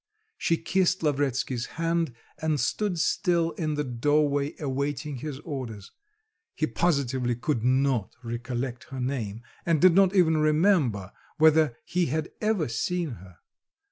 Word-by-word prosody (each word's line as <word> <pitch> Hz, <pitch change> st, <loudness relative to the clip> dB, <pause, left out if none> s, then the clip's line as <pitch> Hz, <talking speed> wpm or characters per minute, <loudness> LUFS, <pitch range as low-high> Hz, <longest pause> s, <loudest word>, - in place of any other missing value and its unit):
She 165 Hz, -, +1 dB
kissed 185 Hz, +1 st, +1 dB
Lavretsky's 135 Hz, -4 st, 0 dB
hand 165 Hz, -5 st, 0 dB, 0.3 s
and 155 Hz, -2 st, +1 dB
stood 205 Hz, +2 st, 0 dB
still 170 Hz, 0 st, +1 dB
in 155 Hz, -3 st, -2 dB
the 150 Hz, -, -1 dB
doorway 145 Hz, +3 st, +1 dB
awaiting 140 Hz, 0 st, -2 dB
his 145 Hz, +1 st, -5 dB
orders. 120 Hz, -, -6 dB, 0.6 s
He 155 Hz, -, +1 dB
positively 135 Hz, -8 st, 0 dB
could 120 Hz, -1 st, -1 dB
not 130 Hz, -4 st, +1 dB
recollect 120 Hz, +1 st, -4 dB
her 135 Hz, -, -7 dB
name 120 Hz, -4 st, -3 dB, 0.2 s
and 165 Hz, -3 st, +2 dB
did 185 Hz, +1 st, +6 dB
not 195 Hz, +1 st, +4 dB
even 160 Hz, -4 st, +4 dB
remember 150 Hz, -, +2 dB, 0.3 s
whether 155 Hz, -5 st, +4 dB
he 175 Hz, +1 st, 0 dB
had 155 Hz, +4 st, -2 dB
ever 210 Hz, -7 st, +1 dB
seen 170 Hz, +7 st, -1 dB
her. 95 Hz, -5 st, -12 dB
145 Hz, 135 wpm, -27 LUFS, 125-165 Hz, 0.6 s, did